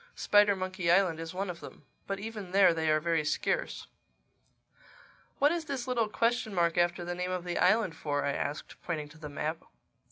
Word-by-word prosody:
Spidermonkey 185 -4 +3
Island 175 -3 +3
is 165 0 -5
one 195 +2 -3
of 180 -2 -6
them. - - -12 0.2
But 195 0 -3
even 210 -3 -7
there 195 -3 +6
they 160 -1 0
are 155 0 +4
very 165 0 +1
scarce." 145 - -1 1.5
"What 290 +1 +4
is 335 -1 -2
this 270 -4 -4
little 235 -4 +1
question 230 -2 0
mark 170 -1 +2
after 175 0 +1
the 175 - -3
name 180 +1 -3
of 185 -1 -2
the 175 -1 -2
island 190 -1 +3
for?" 145 -2 -2
I 140 - 0
asked, 145 +2 -4
pointing 155 -4 -4
to 160 +2 -16
the 150 -2 -7
map. 155 +3 -3
180 Hz, 190 wpm, -30 LUFS, 165-205 Hz, 1.5 s, there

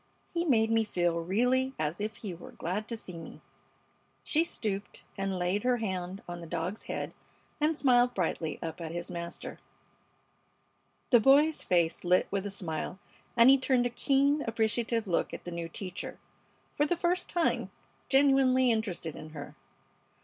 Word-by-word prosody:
He 340 0 0
made 225 -7 +3
me 225 0 +4
feel 175 -5 0
really 250 +9 +1
as 155 +5 -2
if 215 +1 -3
he 210 -5 -6
were 170 - -11
glad 200 +6 -3
to 230 - -4
see 180 -5 -7
me." 165 - -10 0.8
She 320 +2 +2
stooped 205 -10 -3
and 195 -1 -2
laid 180 +3 0
her 250 +1 +2
hand 190 -3 -4
on 175 0 -6
the 170 - -8
dog's 175 +6 -3
head - - -3 0.5
and 305 +1 +2
smiled 245 -3 +4
brightly 165 -3 -1
up 165 +1 -5
at 160 -1 -4
his 175 +1 -5
master. 170 -1 -6 1.5
The 240 - +8
boy's 290 +6 +5
face 170 -2 +1
lit 180 +1 +3
with 200 0 -1
a - - -3
smile, 175 -3 -3 0.4
and 235 +3 +8
he 275 - +6
turned 255 -2 +2
a 245 - 0
keen, 280 +4 +2
appreciative 225 0 0
look 180 -4 0
at - - -10
the 175 - -6
new 170 -1 -4
teacher, 180 +1 -6 0.6
for 295 - +2
the 350 - 0
first 355 +1 0
time 345 -2 +1 0.4
genuinely 270 -2 +5
interested 200 -8 -2
in 155 - -9
her. 145 -2 -8
215 Hz, 165 wpm, -30 LUFS, 175-255 Hz, 1.5 s, The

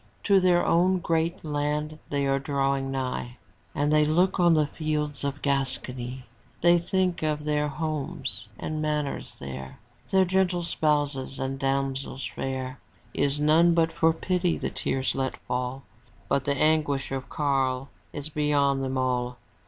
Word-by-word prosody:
To 200 -2 +5
their 180 -1 +3
own 180 +2 +4
great 165 -1 -1
land 150 +1 -1
they 140 -1 0
are 135 0 +2
drawing 135 -1 0
nigh. 125 -2 -3 0.4
And 145 +1 +1
they 155 0 +5
look 175 +6 +2
on 175 -2 +5
the 155 -1 +4
fields 150 -1 -2
of 140 0 -3
Gascony. 130 -2 -2 0.4
They 175 0 +6
think 180 +1 0
of 150 -1 -1
their 150 0 +1
homes 145 -5 -3
and 155 0 -3
manors 150 -2 -2
there. 65 -1 -7 0.3
Their 190 -1 +4
gentle 180 -1 +1
spouses 145 -5 0
and 135 0 -3
damsels 135 -1 -1
fair. 130 +1 -4 0.3
Is 140 +1 +1
none 165 +3 +5
but 165 -1 +2
for 165 0 +4
pity 180 +1 0
the - - -3
tear 135 - -2
lets 130 -1 -2
fall, 125 +2 -2 0.4
But 140 -1 +1
the 140 0 +1
anguish 150 -3 +2
of 135 -1 -4
Karl 135 -2 0 0.2
is 145 0 -6
beyond 145 -2 +2
them 130 0 -2
all. 125 -1 0
145 Hz, 150 wpm, -27 LUFS, 135-155 Hz, 0.4 s, They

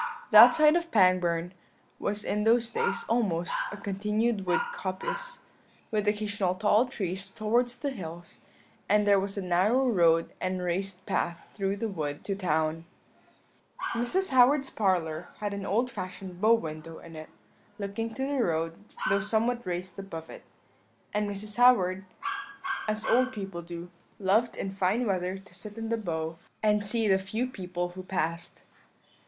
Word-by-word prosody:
That - - +10
side 305 0 +6
of 340 -1 0
Pangbourne 180 - +3 0.5
was 205 +1 -1
in 210 0 -1
those 230 +1 +3
days - - 0
almost 195 -8 0 0.2
a 210 - -6
continued 210 +1 -1
wood 180 - +3
coppice, - - -4 0.5
with 210 -1 0
occasional 205 -3 0
tall 210 +5 +3
trees 195 -5 -3
towards 240 +4 0
the 280 +3 -2
hills, 175 -6 -8 0.5
and 210 +1 +4
there 200 -1 +5
was 195 +1 -3
a 200 - -2
narrow 200 +9 +3
road 165 -7 +3
and 185 0 -1
raised 185 +1 -2
path 170 -1 -2
through 195 -1 -1
the 225 +3 -2
wood 150 -7 -4
to 200 - -2
the 200 - -7
town. 160 -1 0 1.1
"Mrs. 245 +12 +1
Howard's 265 +2 +5
parlour 175 -5 0
had 205 -1 -2
an 200 -1 -4
old 240 +5 +1
fashioned 185 -1 -7
bow 220 +2 +6
window 160 -4 -6
in 165 -1 -12
it, 155 0 -9 0.5
looking 210 +2 -3
to 265 - -2
the 280 -2 0
road, 165 -2 0 0.3
though 195 +1 +3
somewhat 230 +4 +1
raised 180 +1 -4
above 165 -5 -7
it; - - -11 0.7
and 210 0 0
Mrs. 205 +2 -5
Howard, 190 -7 +4 0.8
as 215 0 -1
old 255 +2 +3
people 195 -6 -6
do, 170 +1 -8 0.3
loved 215 +4 +2
in 195 - -3
fine 195 +5 +1
weather 185 -2 -1
to 195 +1 -16
sit 210 0 -7
in 225 0 -4
the 230 - +2
bow, 165 -5 -3 0.2
and 210 -1 +3
see 220 +2 0
the 190 -1 +4
few 215 +6 -2
people 180 -7 -4
who 185 +1 -8
passed. 170 -2 -3
200 Hz, 160 wpm, -28 LUFS, 180-225 Hz, 1.1 s, That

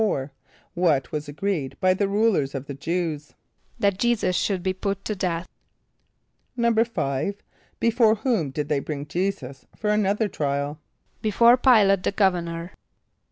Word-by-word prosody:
= 220 - +3 0.6
What 160 -7 +1
was 150 -1 -4
agreed 155 -3 -3
by 185 -1 +4
the 195 +2 0
rulers 200 -9 +1
of 135 0 -4
the 140 - -6
Jew[s+]? 155 0 -3 0.4
=That 200 -2 +1
J[=e]´[s+]us 235 -6 +1
should 190 -2 0
be 190 -1 0
put 195 +1 -3
to 215 - -2
death.= 180 -2 -2 1.1
=5.= 220 - 0 0.4
Before 230 -1 +4
whom 220 - 0
did 145 +2 -3
they 150 -2 +1
bring 145 0 -5
J[=e]´[s+]us 150 -6 -3
for 210 0 -1
another 210 +1 +1
trial? 145 -3 -2 0.4
=Before 235 +3 +5
P[=i]´late 215 -7 +4
the - - 0
governor. 175 -3 0
185 Hz, 140 wpm, -24 LUFS, 150-210 Hz, 1.1 s, =Before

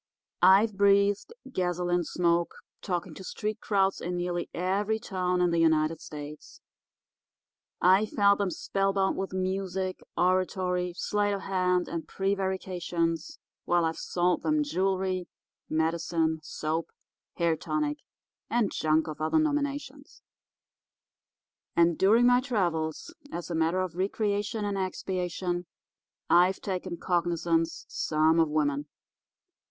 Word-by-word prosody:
I've 195 +4 +6
breathed 200 - +3 0.2
gasoline 175 -3 0
smoke 170 +1 0 0.3
talking 180 -3 -3
to 190 - -10
street 210 +3 -4
crowds 195 -2 +1
in 180 +1 -3
nearly 175 0 -2
every 200 +5 0
town 180 -5 -1
in 175 -1 +3
the 170 - +1
United 160 0 +2
States. 150 -2 -9 1.2
I've 190 +4 +5
held 200 -1 +5
'em 200 - +1
spellbound 195 +1 0
with 195 - -3
music, 185 0 -2 0.2
oratory, 180 -1 +1
sleight 205 -1 0
of 195 - -5
hand, 180 -2 +1
and 165 -1 -5
prevarications, 185 -4 -2 0.3
while 175 -1 +2
I've 160 0 -2
sold 175 0 0
'em 305 -1 +2
jewelry, 190 -6 -1 0.4
medicine, 160 0 0
soap, 155 +1 -3 0.5
hair 170 -2 +2
tonic, 295 - -2 0.5
and 235 -4 +1
junk 155 0 +2
of 155 0 -6
other 155 - +2
nominations. 285 -2 -2 1.5
And 170 0 +4
during 220 +8 +4
my 245 0 +6
travels, 175 - -1 0.2
as 175 0 -5
a - - -1
matter 165 +3 +1
of 185 -3 -3
recreation 205 +3 -1
and 200 -1 -2
expiation, 180 -1 -3 0.6
I've 180 +2 +4
taken 185 -2 -4
cognisance 170 -2 0
some 160 +1 +2
of 160 -2 +3
women. 145 -1 0
180 Hz, 120 wpm, -28 LUFS, 170-195 Hz, 1.5 s, I've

